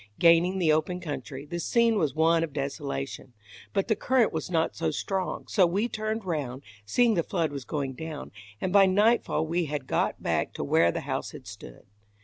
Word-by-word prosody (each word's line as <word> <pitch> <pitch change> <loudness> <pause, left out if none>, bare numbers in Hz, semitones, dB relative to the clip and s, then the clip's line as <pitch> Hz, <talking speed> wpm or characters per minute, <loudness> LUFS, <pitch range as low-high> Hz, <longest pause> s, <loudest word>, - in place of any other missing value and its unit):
Gaining 170 +2 +5
the 170 -4 +3
open 170 +4 0
country, 145 -4 -6
the 170 +3 -5
scene 230 +5 +2
was 155 -10 0
one 165 +1 +3
of 155 -4 -4
desolation; 140 -2 -4 0.4
but 195 -1 0
the 220 - +2
current 245 +2 +2
was - - -3
not 165 -2 0
so 165 -1 -1
strong, 185 +5 -3
so 190 -4 +4
we 200 +7 0
turned 215 -1 -3
round, 140 -6 -3 0.2
seeing 240 - +3
the 175 - +2
flood 165 -3 -1
was 140 -3 -6
going 140 +1 -3
down, 160 +2 -7 0.3
and 185 - -2
by 195 -1 +7
nightfall 205 -4 +2
we 170 +2 0
had 145 -2 -4
got - - -1
back - - 0
to - - -4
where 80 +4 +3
the - - -4
house - - -4
had - - -10
stood. - - -11
165 Hz, 195 wpm, -27 LUFS, 145-195 Hz, 0.4 s, by